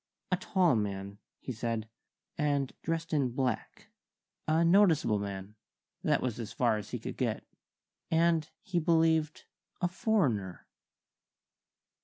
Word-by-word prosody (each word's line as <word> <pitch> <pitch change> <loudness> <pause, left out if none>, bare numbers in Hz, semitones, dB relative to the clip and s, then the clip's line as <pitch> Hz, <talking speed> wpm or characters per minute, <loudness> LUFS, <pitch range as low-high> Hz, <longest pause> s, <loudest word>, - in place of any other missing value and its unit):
A 185 - +3
tall 180 -5 +2
man, 100 -1 -3 0.2
he - - -6
said, 115 -2 -3 0.5
and 145 -3 0
dressed 165 0 -2
in 135 -5 +1
black; 125 -3 -2 0.6
a 160 +2 +3
noticeable 165 - +4
man 100 0 -5 0.5
that - - +2
was 120 -3 -2
as 110 -2 -5
far 115 -2 +2
as 105 - -7
he - - -3
could - - -7
get - - -1 0.7
and, 165 -1 +2
he 190 -5 0
believed, 160 -1 +2 0.3
a 180 - +2
foreigner." 140 - 0
145 Hz, 125 wpm, -31 LUFS, 110-165 Hz, 0.7 s, noticeable